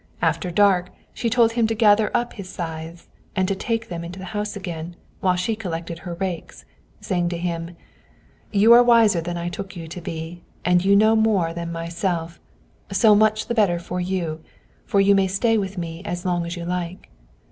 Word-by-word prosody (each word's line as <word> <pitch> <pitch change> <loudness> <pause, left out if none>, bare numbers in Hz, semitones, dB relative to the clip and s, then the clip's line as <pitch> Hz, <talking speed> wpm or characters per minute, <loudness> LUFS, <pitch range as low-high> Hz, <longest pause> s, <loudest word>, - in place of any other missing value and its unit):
After 180 - 0
dark 180 -1 +3 0.2
she 235 -1 -1
told 230 -1 +4
him 230 -1 +1
to 225 - -1
gather 210 -1 +4
up 240 0 -3
his 195 -3 -8
scythes 165 -1 -6 0.3
and 185 -1 +1
take 225 0 -2
them 170 -1 -5
into 175 +2 -8
the 190 - -7
house 210 0 -3
again, 175 -3 -6 0.2
while 185 -1 +2
she 180 +5 -1
collected 170 -5 -5
her 175 -2 -6
rakes, 180 -2 -5 0.3
saying 175 -2 -1
to 170 - -3
him: 170 0 -4 0.7
"You 215 +3 +6
are 240 - +9
wiser 230 -7 +5
than 175 +1 -4
I 170 0 -3
took 190 +2 -6
you 165 -2 -7
to 170 +2 -8
be, 165 +1 -6 0.2
and 180 0 +3
you 200 +1 +4
know 215 +2 +5
more 205 -7 +2
than 170 0 -5
myself; 170 0 -3 0.5
so 210 +2 +5
much 215 +1 +3
the - - -2
better 205 -7 +3
for 180 +1 -4
you, 175 -4 -2 0.5
for 200 - +2
you 200 +1 +5
may 195 -1 +3
stay 195 +5 0 0.5
as 175 -1 -5
long 175 -1 +1
with 170 - -4
me - - -4
as 170 - -4
you 170 -1 -6
like." 180 0 -4
180 Hz, 195 wpm, -23 LUFS, 170-210 Hz, 0.7 s, are